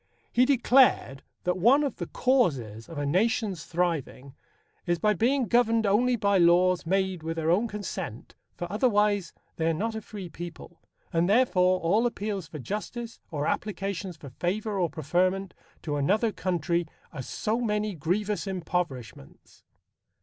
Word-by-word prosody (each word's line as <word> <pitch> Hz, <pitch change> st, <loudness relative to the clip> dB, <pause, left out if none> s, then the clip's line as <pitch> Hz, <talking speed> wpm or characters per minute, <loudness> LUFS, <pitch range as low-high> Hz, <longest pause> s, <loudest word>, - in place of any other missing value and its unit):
He 250 Hz, -, +4 dB
declared 255 Hz, -, +4 dB, 0.2 s
that 180 Hz, +1 st, 0 dB
one 255 Hz, +10 st, +5 dB
of 280 Hz, -5 st, -2 dB
the 175 Hz, -, -4 dB
causes 135 Hz, -, 0 dB
of 165 Hz, -, -8 dB
a 145 Hz, -, -1 dB
nation's 195 Hz, -, 0 dB
thriving... 165 Hz, -6 st, -2 dB, 0.5 s
is 175 Hz, 0 st, +2 dB
by 210 Hz, +6 st, +2 dB
being 250 Hz, +6 st, +2 dB
governed 230 Hz, -1 st, +3 dB
only 240 Hz, +5 st, +3 dB
by 200 Hz, -3 st, +2 dB
laws 175 Hz, 0 st, +4 dB
made 190 Hz, -1 st, 0 dB
with 165 Hz, +1 st, -4 dB
their 160 Hz, 0 st, +1 dB
own 210 Hz, +7 st, +2 dB
consent, 190 Hz, -, -6 dB, 0.2 s
for 175 Hz, -, -4 dB
otherwise 210 Hz, -, +2 dB, 0.3 s
they 160 Hz, -, 0 dB
are 165 Hz, -, +1 dB
not 225 Hz, +7 st, -2 dB
a 220 Hz, -, -4 dB
free 200 Hz, -3 st, -8 dB
people. 170 Hz, +1 st, -9 dB, 0.3 s
And, 170 Hz, +2 st, +2 dB
therefore, 185 Hz, -6 st, +3 dB
all 210 Hz, +8 st, +3 dB
appeals 205 Hz, -6 st, -4 dB
for 165 Hz, -, -8 dB
justice, 220 Hz, -, -5 dB
or 145 Hz, -2 st, -2 dB
applications 195 Hz, -2 st, -3 dB
for 140 Hz, -4 st, -11 dB
favour 200 Hz, -, -2 dB
or 175 Hz, -2 st, +1 dB
preferment, 180 Hz, +5 st, 0 dB, 0.3 s
to 145 Hz, -2 st, -2 dB
another 210 Hz, +11 st, +2 dB
country 175 Hz, -3 st, -1 dB, 0.3 s
are 140 Hz, -, -5 dB
so 215 Hz, -, -2 dB
many 210 Hz, -2 st, -1 dB
grievous 200 Hz, +6 st, -1 dB
impoverishments. 165 Hz, -, -5 dB
185 Hz, 150 wpm, -27 LUFS, 165-215 Hz, 0.5 s, one